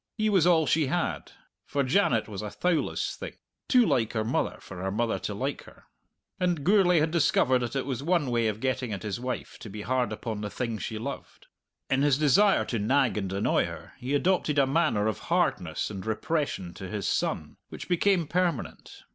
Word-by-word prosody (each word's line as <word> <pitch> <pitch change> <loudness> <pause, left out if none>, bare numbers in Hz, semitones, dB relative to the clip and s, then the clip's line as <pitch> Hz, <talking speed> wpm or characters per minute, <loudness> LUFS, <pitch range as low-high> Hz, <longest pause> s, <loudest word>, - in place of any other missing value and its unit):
He 215 -1 +1
was 180 -4 +4
all 165 -3 +4
she 150 +2 +2
had, 175 +6 -2 0.3
for 140 - -1
Janet 130 - +2
was 105 -2 -6
a 105 - -4
thowless 175 - -1
thing, - - -8 0.3
too 250 -3 +5
like 115 - +1
her 110 -2 0
mother 110 - -1
for 90 -2 -9
her 95 - -1
mother 110 +3 -1
to - - -4
like - - -3
her. - - -17 0.6
And 175 -5 0
Gourlay 180 -2 +4
had 155 +1 +1
discovered 135 -5 +3
that 120 +1 -4
it 135 - -1
was 130 -2 -3
one 160 -4 +1
way 115 -1 +2
of 105 0 -2
getting 130 -2 -1
at 95 - -5
his 105 0 -3
wife 125 0 -5
to 110 - -9
be 105 +1 -7
hard 125 -1 0
upon 110 -1 -4
the 105 - -3
thing 115 -1 -3
she 110 - -4
loved. 135 +6 -7 0.4
In 135 0 +1
his 145 -2 +3
desire 185 +8 +4
to 115 - -2
nag 130 +4 +2
and 95 -3 -2
annoy 100 +2 +1
her - - -9
he 130 +3 -1
adopted 160 -2 +1
a 140 - +5
manner 135 -7 +1
of 110 -3 -1
hardness - - 0
and 95 -3 -6
repression 110 - -2
to 95 -1 -8
his 105 0 -3
son - - -1
which - - -8
became 180 0 +2
permanent. 175 -3 -2
130 Hz, 205 wpm, -27 LUFS, 110-165 Hz, 0.6 s, too